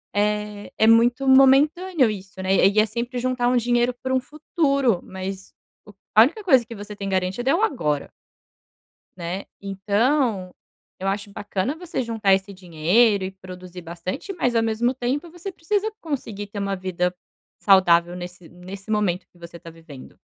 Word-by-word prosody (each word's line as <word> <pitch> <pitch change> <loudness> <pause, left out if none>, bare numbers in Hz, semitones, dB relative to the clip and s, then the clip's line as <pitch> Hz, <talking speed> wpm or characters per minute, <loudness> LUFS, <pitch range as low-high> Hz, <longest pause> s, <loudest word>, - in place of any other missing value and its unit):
eh, 210 0 -1
é 220 - +5
muito 240 +4 +4
momentâneo 270 +3 +5
isso, 190 -2 -7
né? 190 +1 +1
E 195 +3 +4
é 215 - +5
sempre 240 +3 -4
juntar 250 -1 0
um 250 - +2
dinheiro 240 +1 +1
para 260 0 -2
um - - +3
futuro, 275 - 0
mas 190 +1 -7 0.3
o 210 - -14 0.2
a 215 - +9
única 315 - +2
coisa 265 -10 +5
que 230 +1 -9
você 205 0 -8
tem 200 -1 -5
garantido 190 +7 -1
é 295 - +4
o 365 - 0
agora 150 - -1 1.1
Né? 180 +3 -5 0.2
Então, 200 +1 0 0.5
eu 190 - -3
acho 200 +1 -2
bacana 205 +6 -3
você 350 -5 -4
juntar 225 -5 +1
esse 190 +1 0
dinheiro 190 +4 +2
e 185 - -4
produzir 185 -1 -11
bastante, 175 - -6
mas, 250 -9 -1
ao 225 - +3
mesmo 225 +3 0
tempo, 265 +6 -3
você 350 +3 -7
precisa 410 +6 -1
conseguir 225 -10 -5
ter 205 0 -7
uma 200 0 -1
vida 180 -1 -2 0.5
saudável 175 -3 +4
nesse 175 -1 -9
nesse 190 +4 -10
momento 200 -4 0
que 175 - -24
você 170 0 -10
tá 165 - -12
vivendo. 160 -5 -13
210 Hz, 170 wpm, -23 LUFS, 185-255 Hz, 1.1 s, a